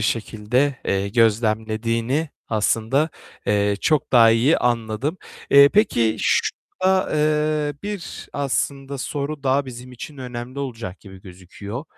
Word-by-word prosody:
şekilde, 115 +5 0
eee, 100 +1 0
gözlemlediğini 115 +5 +1 0.2
aslında, 115 +7 +1 0.4
eee, 100 -1 +2
çok 155 -3 +1
daha 115 -2 +7
iyi 120 +8 +3
anladım. 120 - -1 0.3
Eee, 140 0 +8
peki, 120 - +2
şurada, 190 0 0
eee, 150 -1 +1
bir, 205 -3 -6
aslında 140 0 -2
soru, 145 +1 -4
daha 135 +1 +1
bizim 125 0 -9
için 145 +4 -9
önemli 125 +1 -7
olacak 115 -9 -5
gibi 95 -2 -13
gözüküyor. 100 - -8
125 Hz, 115 wpm, -22 LUFS, 110-145 Hz, 0.4 s, Eee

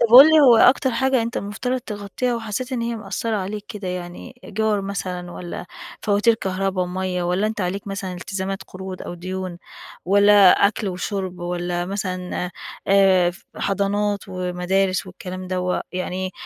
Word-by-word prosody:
طب 235 - +5
قُل 280 +4 +12
لي 310 - +7
هو 245 -5 +7
أكتر 260 +2 +5
حاجة 260 0 +2
أنت 235 +2 -4
المفترض 250 +5 -2
تغطّيها، 210 +3 -3
وحسّيت 230 +4 -4
إن 240 - -1
هي 235 0 -2
مأثّرة 220 +1 -3
عليك 205 +2 -4
كده. 200 -3 -6
يعني 180 +7 -7
إيجار 215 0 0
مثلًا، 180 -2 -4
والّا 175 0 -7 0.4
فواتير 210 +3 +3
كهربا 190 -2 -1
ومَيّة، 180 0 -2
والّا 180 +4 +1
أنت 215 -1 -3
عليك 190 +3 -2
مثلًا 195 -2 -4
التزامات 190 +2 -4
قروض، 185 0 -8
أو - - -6
ديون، 185 0 -5 0.5
والّا 200 0 +7 0.2
أكل 205 0 -2
وشُرب، 185 0 -3
والّا 175 0 -2
مثلًا 185 -2 -3 0.4
آآ 190 -3 +5
ف 180 - -16
حضانات، 205 +1 0
ومدارس، 185 +1 0
والكلام 185 0 -7
دوّة 180 0 -1
يعني 185 +1 -3
195 Hz, 155 wpm, -22 LUFS, 180-210 Hz, 0.5 s, قُل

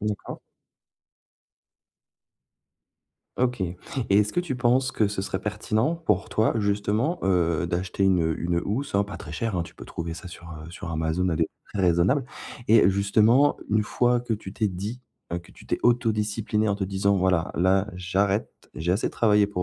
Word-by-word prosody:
D'accord. 105 -1 -4 3.0
OK. 125 -2 +1
Et 90 0 -3 0.3
est-ce 105 +1 +4
que 175 - +1
tu 170 -7 -3
penses 130 +2 +2
que 105 -2 +2
ce 100 -1 -3
serait 95 -1 -3
pertinent 110 +7 0
pour 105 - 0
toi, 110 - +2
justement, 105 - 0
heu, 85 -3 +2
d'acheter 90 +3 -2
une 85 -4 +3
une 85 0 0
housse, 130 +6 -3
hein, 100 +1 +3
pas 100 - -8
très - - -9
chère, 115 -6 -2
hein, 85 - 0
tu - - -11
peux - - -11
trouver 85 0 -5
ça 90 +2 -8
sur, 85 - -12
heu, 80 0 -9
sur 85 0 -7
Amazon 80 +3 0
à 80 - 0
des 80 - +3
prix - - -10 0.2
très 100 - -2
raisonnables, 90 - +3 0.4
et, 115 0 +7
heu, - - +6
justement 110 +8 +4
une 105 0 +3
fois 120 +3 +1
que 120 -2 -2
tu 95 -2 -8
t'es 110 -2 0
dit 100 +7 -5 0.4
que - - -18
tu - - -16
t'es - - -1
auto-disciplinée 110 -2 +1
en 100 - +2
te 100 -1 -2
disant: 100 +1 +1
«Voilà, 90 -2 +1
là 95 +3 +3
j'arrête. 95 +3 0 0.2
J'ai 85 +4 0
assez 100 - 0
travaillé 105 -2 +3
pour 90 -3 -3
100 Hz, 185 wpm, -25 LUFS, 90-110 Hz, 3.0 s, et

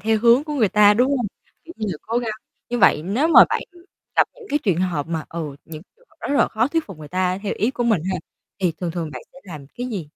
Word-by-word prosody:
theo 220 +1 +1
hướng 240 +5 +5
của 300 - -4
người 230 -8 +3
ta, 210 +1 +5
đúng 260 +5 +2
không? 240 -4 -1 0.4
Kiểu 335 - -10
như 215 - -3
là 160 - -4
cố 230 +2 -1
gắng. 235 -2 -2 0.4
Như 245 0 -2
vậy 175 -6 +5
nếu 235 - 0
mà - - +9
bạn, - - -1
ừm, 345 0 -18 0.3
gặp - - +4
những 475 -4 -14
cái 295 - +1
truyền 190 -6 +1
hợp 165 -5 -1
mà, 160 -2 -3
ừ, 155 -4 -5
những 155 -1 -9
người - - -27
họ - - -29
rất 285 - 0
là - - +4
khó 225 +3 0
thuyết 325 +1 -1
phục 190 -6 -10
người 150 -1 -10
ta 185 0 0
theo 205 - -2
ý 225 +5 +1
của 240 -2 -3
mình 215 -9 +2
ha, - - -1 0.4
thì 180 -3 +1
thường 175 - -2
thường 165 -2 -4
bạn - - -7
sẽ 270 - -14
làm 155 -7 -9
cái 245 - -2
gì? 185 -10 -5
210 Hz, 285 wpm, -22 LUFS, 170-245 Hz, 0.4 s, mà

